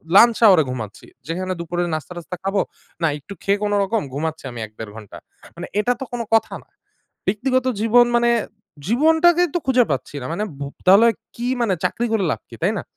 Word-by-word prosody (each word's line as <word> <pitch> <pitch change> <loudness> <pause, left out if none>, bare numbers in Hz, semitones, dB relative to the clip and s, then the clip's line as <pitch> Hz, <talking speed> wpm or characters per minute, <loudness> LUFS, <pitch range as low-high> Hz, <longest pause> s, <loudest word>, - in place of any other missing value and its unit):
lunch 230 +2 +7
hour 195 -4 +8
এ - - +1
ঘুমাচ্ছি। 115 -5 -6 0.2
যেখানে 185 +3 -2
দুপুরে 175 +1 -3
নাস্তা-টাস্তা 175 +4 -6
খাবো, 195 0 +1 0.4
না 165 - +3
একটু 150 +8 -11
খেয়ে 200 +1 +2
কোনোরকম 205 +1 +1
ঘুমাচ্ছি 160 +2 -3
আমি 120 - -8
১-১.৫ 110 0 -10
ঘন্টা। 110 -3 -10 0.4
মানে - - -7
এটা 245 +4 +2
তো - - -4
কোনো 235 -1 -2
কথা 225 - +3
না। - - -36 0.6
ব্যক্তিগত 255 +6 +1 0.2
জীবন 240 +2 +5
মানে 235 0 +3 0.6
জীবনটাকেই 320 +7 +4
তো - - +3
খুঁজে 255 -2 +4
পাচ্ছি 135 +2 -3
না। - - -6
মানে 205 +5 -2 0.2
ভু 140 - -4 0.2
তাহলে 200 +5 +7 0.3
কি 240 +1 -3
মানে 210 -5 +2
চাকরি 240 - 0
করে 215 -4 +1
লাভ - - -3
কি, - - -10
তাই - - +2
না? - - -4
200 Hz, 190 wpm, -21 LUFS, 160-240 Hz, 0.6 s, hour